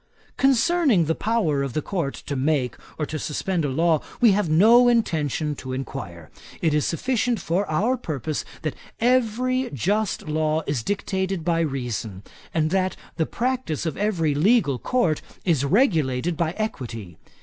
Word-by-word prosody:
'Concerning 270 - +3
the 160 - +1
power 200 -9 0
of 135 -3 -3
the 155 - 0
Court 170 -9 -2
to 145 - -6
make 135 -3 0 0.2
or 155 - -1
to 155 +1 -5
suspend 170 +4 -2
a 145 - 0
law, 160 +3 +2 0.2
we 235 -3 +6
have 195 -4 +1
no 225 +10 +6
intention 160 - +1
to 130 -2 -6
inquire. 95 - -6 0.3
It 160 -2 +1
is 150 -1 +1
sufficient 245 +4 0
for 180 +3 -1
our 210 +12 +1
purpose 155 - -3 0.2
that 155 - -1 0.3
every 255 +1 +1
just 200 - -1
law 155 +1 0
is 140 -5 -1
dictated 190 - -2
by 170 -1 +2
reason; 120 - -3 0.3
and 155 -1 0
that 185 0 +1 0.2
the 160 - +1
practice 245 - -2
of 160 - -2
every 175 -8 0
legal 155 - +3
Court 210 -12 +1 0.2
is 160 -7 +2
regulated 160 - +2
by 160 +1 -1
equity. 115 - -5
165 Hz, 155 wpm, -24 LUFS, 145-215 Hz, 0.3 s, we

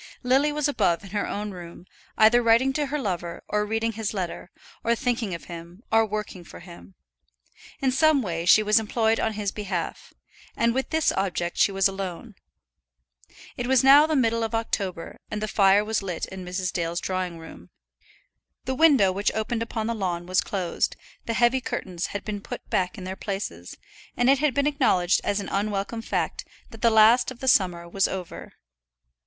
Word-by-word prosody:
Lily 270 +4 +3
was 300 0 0
above 210 -10 +1
in 195 - -11
her 205 0 -1
own 210 0 -4
room, 175 -1 -10 0.3
either 220 +3 +6
writing 235 +3 +3
to 295 0 -1
her 295 +2 -2
lover, 175 - -4
or 210 0 -1
reading 225 +1 -1
his 220 -1 -4
letter, 180 -1 -4 0.3
or 235 +1 +2
thinking 230 -6 -2
of 170 - -9
him, 170 +4 -10
or 225 0 +4
working 210 -3 -5
for - - -12
him. 165 - -14 0.9
In 265 - +3
some 295 0 +3
way 170 -3 -3
she 215 +4 +7
was 210 +1 +4
employed 220 +1 0
on 220 - 0
his 205 -2 -2
behalf, 190 -5 -5 0.5
and 235 0 +2
with 265 +1 -2
this 320 -1 +2
object 175 -3 -2
she - - +4
was 195 0 +3
alone. 195 +3 -6 1.2
It 245 - -4
was 260 -1 +4
now 285 +3 +8
the 315 - 0
middle 230 -4 +2
of 225 +1 -2
October, 195 -6 -3
and 210 - -4
the 215 - -3
fire 200 0 +4
was 220 0 -1
lit 180 -4 -4
in 190 -1 -9
Mrs. 180 0 -3
Dale's 170 0 -2
drawing 185 -2 -3
room. 90 - -12 1.0
The 260 - -1
window 265 -9 +5
which 200 +3 0
opened 225 +1 -2
upon 230 -1 -3
the 230 - -1
lawn 180 -5 -3
was 185 +1 +2
closed, 185 -4 -2 0.3
the 230 - -1
heavy 245 +3 +3
curtains 180 -7 -4
had 200 - -6
been 205 -2 -4
put - - -8
back 180 +2 0
in 190 - -8
their 185 +1 -5
places, 190 - -6 0.4
and 245 +2 +4
it 275 - +3
had 290 -3 +1
been 280 - +2
acknowledged 250 - +2
as 205 - 0
an 200 - -5
unwelcome 205 +2 -2
fact - - -2 0.3
that 225 - -12
the 235 - +5
last 220 +2 +5
of 260 -2 -10
the 265 - -5
summer 180 -7 +2
was 195 +2 +1
over. 185 -3 -7
210 Hz, 190 wpm, -25 LUFS, 185-235 Hz, 1.2 s, now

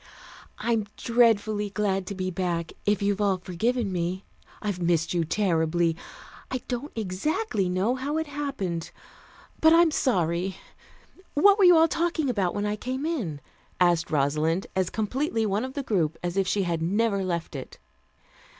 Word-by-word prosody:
"I'm 225 -3 0
dreadfully 215 -3 +2
glad 195 -2 -1
to 200 - -4
be 185 0 -2
back, 170 -2 -2
if 205 -1 +2
you've 200 0 +1
all 200 -2 +2
forgiven 205 +5 -1
me. 180 +2 -2 0.3
I've 205 -4 -3
missed 170 -1 +1
you 170 -1 +1
terribly. 165 -2 +1 0.5
I 255 -1 -3
don't 255 +4 -4
exactly 215 - -1
know 185 +6 +1
how 275 +4 -2
it 320 - -1
happened. 275 - -4 0.7
But 320 0 +6
I'm 335 -1 +6
sorry. 180 - 0 0.8
What 400 +7 +6
were 390 - +6
you 355 -2 +8
all 325 +1 +6
talking 325 -4 0
about 195 -6 -1
when 205 0 -1
I 210 0 -1
came 260 +5 -3
in?" 210 - -3 0.4
asked 175 -2 +3
Rosalind, 155 +5 +1
as 185 -2 +1
completely 225 +1 -1
one 205 +2 0
of 260 0 -6
the 280 - -2
group 165 - 0
as 175 0 -2
if 195 -1 +1
she 200 +1 +1
had 170 -2 -1
never 200 +3 +1
left 170 -4 -3
it. 135 - -7
200 Hz, 160 wpm, -26 LUFS, 175-250 Hz, 0.8 s, you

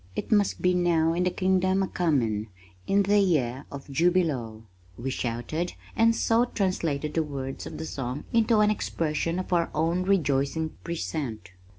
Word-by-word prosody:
It - - -4
must 205 -2 +2
be 180 0 +4
now 170 -2 +2
in 180 +2 0
the - - +3
Kingdom 185 +1 +1
a - - -1
comin' 120 - 0 0.4
In 200 +1 +3
the 205 +1 +3
year 140 -9 +1
of 140 -1 -7
Jubilo! 140 -8 0 0.3
we 130 +3 -3
shouted, 130 +9 -3 0.2
and 230 0 +4
so 230 +1 +3
translated 165 - -1
the 165 - +2
words 135 -3 -5
of 155 - -7
the 160 - -5
song 135 -1 -4
into 225 -1 +4
an 210 0 +4
expression 165 -4 -1
of 185 0 -3
our 170 -1 +2
own 165 +3 +1
rejoicing 160 -5 +1
present. 135 - -4
165 Hz, 165 wpm, -27 LUFS, 140-185 Hz, 0.4 s, be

